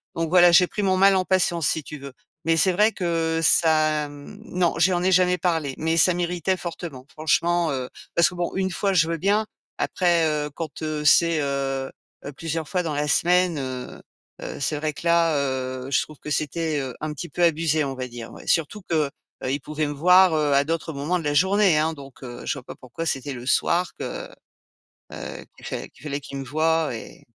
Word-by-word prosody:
donc 165 Hz, -1 st, -1 dB
voilà, 175 Hz, 0 st, +6 dB
j'ai 180 Hz, +1 st, +6 dB
pris 210 Hz, -, -4 dB
mon 190 Hz, -1 st, +2 dB
mal 195 Hz, +1 st, +5 dB
en 185 Hz, -1 st, +1 dB
patience, 175 Hz, -4 st, +1 dB
si 160 Hz, -, 0 dB
tu 150 Hz, -, -8 dB
veux. 140 Hz, -1 st, -10 dB, 0.3 s
Mais 165 Hz, 0 st, +3 dB
c'est 185 Hz, +4 st, +4 dB
vrai 210 Hz, +5 st, +3 dB
que 165 Hz, -4 st, -1 dB
ça, 155 Hz, -1 st, +3 dB
mmh 145 Hz, +8 st, -12 dB
non, 180 Hz, -4 st, 0 dB
je 165 Hz, +1 st, +5 dB
lui 185 Hz, -, 0 dB
en 175 Hz, -, 0 dB
ai 190 Hz, -, +2 dB
jamais 180 Hz, 0 st, +3 dB
parlé, 160 Hz, -6 st, 0 dB
mais 160 Hz, +1 st, 0 dB
ça 180 Hz, +2 st, +5 dB
m'irritait 175 Hz, +1 st, -1 dB
fortement, 165 Hz, -7 st, -7 dB
franchement, 165 Hz, +2 st, +1 dB
heu. 130 Hz, -2 st, -3 dB, 0.3 s
Parce 170 Hz, -, +5 dB
que 180 Hz, -, -11 dB
bon, 175 Hz, -1 st, -2 dB
1 190 Hz, 0 st, 0 dB
fois 195 Hz, +2 st, -1 dB
je 165 Hz, -3 st, +3 dB
veux 165 Hz, 0 st, -2 dB
bien! 205 Hz, +5 st, +1 dB, 0.3 s
Après, 175 Hz, -3 st, +2 dB
heu, 150 Hz, -1 st, -2 dB
quand, 160 Hz, 0 st, -6 dB
heu, 155 Hz, -1 st, -2 dB
c'est, 165 Hz, +2 st, +5 dB
heu, 135 Hz, -1 st, -2 dB, 0.4 s
heu, 140 Hz, -, -5 dB
plusieurs 165 Hz, -1 st, -4 dB
fois 180 Hz, -1 st, 0 dB
dans 160 Hz, -3 st, -3 dB
la 145 Hz, +1 st, -1 dB
semaine, 180 Hz, +1 st, +3 dB
heu, 130 Hz, -2 st, -6 dB, 0.4 s
heu, -, -, -6 dB
c'est 150 Hz, +1 st, -1 dB
vrai 155 Hz, 0 st, -2 dB
que -, -, -10 dB
là, 170 Hz, -2 st, +3 dB
heu, 130 Hz, -1 st, -3 dB
je 135 Hz, -, +3 dB
trouve 155 Hz, -2 st, -14 dB
que -, -, -8 dB
c'était, 155 Hz, +1 st, -1 dB
heu, 130 Hz, -3 st, -4 dB
un 155 Hz, 0 st, -3 dB
petit 170 Hz, +4 st, -7 dB
peu 175 Hz, -, -4 dB
abusé, 160 Hz, -2 st, +2 dB
on 135 Hz, -1 st, -4 dB
va 130 Hz, 0 st, -4 dB
dire, 120 Hz, -1 st, -9 dB
ouais. -, -, -12 dB
Surtout 165 Hz, +6 st, 0 dB
que, 155 Hz, -4 st, +1 dB, 0.3 s
heu, 130 Hz, -, -1 dB
il 140 Hz, -, -1 dB
pouvait 155 Hz, +2 st, -3 dB
me 145 Hz, -, -3 dB
voir, 180 Hz, +4 st, +5 dB
heu, 150 Hz, -2 st, +1 dB
à 140 Hz, 0 st, +4 dB
d'autres 165 Hz, +1 st, -2 dB
moments 150 Hz, +6 st, -1 dB
de -, -, -7 dB
la 145 Hz, -, 0 dB
journée, 190 Hz, +2 st, +4 dB
hein. 160 Hz, +1 st, +2 dB
Donc, 140 Hz, -3 st, -13 dB
heu, 120 Hz, -1 st, -8 dB
je -, -, 0 dB
vois 140 Hz, -, -9 dB
pas -, -, -10 dB
pourquoi 130 Hz, +6 st, -7 dB
c'était 140 Hz, -2 st, -2 dB
le 120 Hz, -1 st, -8 dB
soir 170 Hz, +5 st, +1 dB
que, -, -, -5 dB, 0.9 s
heu, -, -, -7 dB
qu'il -, -, -12 dB
fa -, -, -5 dB
qu’il -, -, -22 dB
fallait 145 Hz, -1 st, -3 dB
qu'il 140 Hz, 0 st, -8 dB
me 135 Hz, -, -5 dB
voie 160 Hz, +3 st, +1 dB
et 115 Hz, -, -10 dB
160 Hz, 230 wpm, -24 LUFS, 145-175 Hz, 0.9 s, voilà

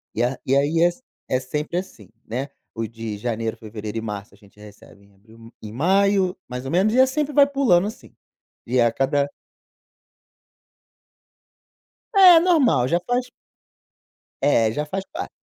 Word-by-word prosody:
E 115 Hz, -, -1 dB
a 125 Hz, +1 st, -1 dB
e 135 Hz, -, +2 dB
aí 150 Hz, +4 st, +2 dB
é 175 Hz, -, +6 dB
s 175 Hz, +8 st, -5 dB, 0.3 s
é 130 Hz, -, 0 dB
sempre 150 Hz, +6 st, -4 dB
assim, 185 Hz, -9 st, -7 dB, 0.2 s
né, 130 Hz, +5 st, -4 dB, 0.3 s
o 115 Hz, 0 st, -3 dB
de 115 Hz, -2 st, -7 dB
janeiro, 115 Hz, 0 st, -3 dB
fevereiro 110 Hz, 0 st, -7 dB
e -, -, -2 dB
março, 105 Hz, -2 st, -7 dB
a -, -, -20 dB
gente 105 Hz, 0 st, -22 dB
recebe 105 Hz, -1 st, -16 dB
em 100 Hz, -, -25 dB
abril 115 Hz, +3 st, -17 dB
em 105 Hz, -1 st, -8 dB
maio, 190 Hz, -, +2 dB
mais 125 Hz, +1 st, -6 dB
ou 135 Hz, -, -4 dB
menos, 195 Hz, +6 st, +2 dB
e 255 Hz, -, +3 dB
é 260 Hz, -, +7 dB
sempre 290 Hz, +2 st, -2 dB
vai 280 Hz, 0 st, +6 dB
pulando 250 Hz, -10 st, +2 dB
assim, 220 Hz, -, -10 dB, 0.5 s
e 125 Hz, +2 st, +1 dB
a 120 Hz, -, +3 dB
cada 140 Hz, +3 st, 0 dB, 2.9 s
É, 365 Hz, -4 st, +9 dB
normal, 300 Hz, -, +3 dB
já 170 Hz, +4 st, +1 dB
faz 245 Hz, +1 st, 0 dB, 1.1 s
É, 115 Hz, -6 st, +3 dB
já 150 Hz, +5 st, -3 dB
faz 190 Hz, +5 st, -4 dB
parte. -, -, -5 dB
135 Hz, 165 wpm, -22 LUFS, -, 2.9 s, É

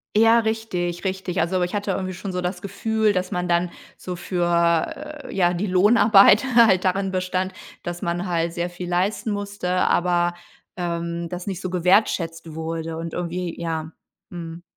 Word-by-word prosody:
Ja, 225 Hz, +2 st, +6 dB
richtig, 200 Hz, -6 st, -2 dB
richtig. 190 Hz, -1 st, -2 dB
Also, 180 Hz, +3 st, +1 dB
ich 180 Hz, -, -1 dB
hatte 205 Hz, -1 st, -1 dB
irgendwie 185 Hz, 0 st, -3 dB
schon 185 Hz, +2 st, -6 dB
so 180 Hz, -, -2 dB
das 180 Hz, 0 st, -3 dB
Gefühl, 215 Hz, +2 st, 0 dB
dass 185 Hz, -1 st, -2 dB
man 180 Hz, 0 st, -1 dB
dann 175 Hz, 0 st, +1 dB, 0.2 s
so 180 Hz, -1 st, -6 dB
für 175 Hz, -, 0 dB
äh, -, -, -8 dB
ja, 175 Hz, -2 st, +2 dB
die 185 Hz, +4 st, -2 dB
Lohnarbeit 205 Hz, +2 st, +6 dB
halt 210 Hz, -6 st, +6 dB
darin 190 Hz, +1 st, 0 dB
bestand, 185 Hz, 0 st, -1 dB, 0.3 s
dass 175 Hz, 0 st, -5 dB
man 175 Hz, +2 st, -2 dB
halt 170 Hz, -1 st, 0 dB
sehr 175 Hz, 0 st, -2 dB
viel 175 Hz, 0 st, -7 dB
leisten 195 Hz, +5 st, 0 dB
musste, 205 Hz, -2 st, -4 dB
aber, 175 Hz, -1 st, +2 dB, 0.4 s
ähm, 170 Hz, -1 st, -3 dB
das 180 Hz, +2 st, -6 dB
nicht 190 Hz, -2 st, -3 dB
so 185 Hz, -, -3 dB
gewertschätzt 175 Hz, -3 st, +1 dB
wurde 160 Hz, 0 st, -4 dB
und 165 Hz, 0 st, -5 dB
irgendwie 175 Hz, 0 st, -3 dB
ja. 160 Hz, -1 st, -3 dB, 0.4 s
Mhm. 170 Hz, -1 st, -8 dB
180 Hz, 165 wpm, -23 LUFS, 170-195 Hz, 0.4 s, Ja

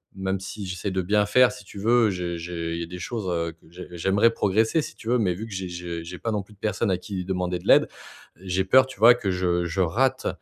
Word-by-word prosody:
même 95 Hz, 0 st, -2 dB
si 100 Hz, +1 st, -7 dB
j'essaie 90 Hz, +2 st, -4 dB
de 95 Hz, -, 0 dB
bien 105 Hz, +3 st, +2 dB
faire, 125 Hz, +4 st, +5 dB
si -, -, -12 dB
tu 100 Hz, -, -12 dB
veux, 115 Hz, +1 st, +3 dB
j'ai 90 Hz, -2 st, -3 dB
j'ai 85 Hz, -1 st, -4 dB
il 85 Hz, -, -4 dB
y -, -, -2 dB
a 85 Hz, -, -7 dB
des 90 Hz, +1 st, -8 dB
choses, 115 Hz, +1 st, -4 dB
heu, 85 Hz, -1 st, -2 dB
que 80 Hz, -, -25 dB
j'ai 90 Hz, +1 st, -10 dB
j'aimerais 95 Hz, +6 st, +2 dB
progresser 110 Hz, -, +1 dB
si -, -, -8 dB
tu 110 Hz, -, -12 dB
veux, 125 Hz, -, +3 dB
mais 95 Hz, -5 st, +1 dB
vu 110 Hz, -, -6 dB
que 110 Hz, -, -9 dB
j'ai 95 Hz, -1 st, -4 dB
je 85 Hz, -1 st, -6 dB
j'ai 90 Hz, +2 st, -8 dB
pas 115 Hz, -, -2 dB
non 105 Hz, -2 st, -1 dB
plus 105 Hz, -, -19 dB
de 100 Hz, -, -25 dB
personnes 105 Hz, 0 st, -1 dB
à 90 Hz, -, +1 dB
qui 95 Hz, -1 st, -5 dB
demander 90 Hz, -1 st, -2 dB
de -, -, -12 dB
l'aide, -, -, +6 dB, 0.5 s
j'ai 95 Hz, +1 st, -2 dB
peur, 130 Hz, +7 st, +6 dB
tu 130 Hz, -, -12 dB
vois, 115 Hz, +2 st, +8 dB
que 100 Hz, -6 st, -2 dB
je 90 Hz, -1 st, 0 dB
je 85 Hz, +2 st, -3 dB
rate, 130 Hz, +10 st, +1 dB
95 Hz, 275 wpm, -25 LUFS, 90-110 Hz, 0.5 s, vois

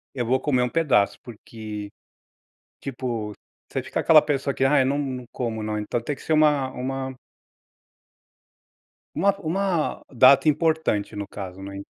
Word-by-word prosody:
eu 125 Hz, -3 st, -1 dB
vou 130 Hz, +2 st, +2 dB
comer 130 Hz, -4 st, +1 dB
um 125 Hz, -, +1 dB
pedaço, 145 Hz, -11 st, +2 dB
porque", 110 Hz, -2 st, -8 dB, 0.9 s
tipo, 120 Hz, -5 st, -4 dB, 0.4 s
você -, -, -2 dB
fica -, -, -3 dB
aquela 155 Hz, -2 st, +7 dB
pessoa 140 Hz, -2 st, -1 dB
que 135 Hz, -, -1 dB
"Ah, 140 Hz, +2 st, +4 dB
eu 130 Hz, -, +3 dB
não 140 Hz, +2 st, 0 dB
não 130 Hz, -3 st, -4 dB
como 115 Hz, -3 st, -3 dB
não". 105 Hz, 0 st, -2 dB
Então 105 Hz, +3 st, -2 dB
tem 145 Hz, +5 st, -3 dB
que -, -, -15 dB
ser 160 Hz, -, -1 dB
uma 150 Hz, -4 st, +3 dB
uma 130 Hz, +1 st, -4 dB, 2.0 s
uma 200 Hz, -, +3 dB
uma 175 Hz, -1 st, -1 dB
data 130 Hz, +5 st, +6 dB
importante, 155 Hz, -10 st, +1 dB
no 100 Hz, -1 st, -4 dB
caso, 95 Hz, -1 st, -8 dB
né 100 Hz, 0 st, -7 dB
130 Hz, 155 wpm, -24 LUFS, 110-150 Hz, 2.0 s, aquela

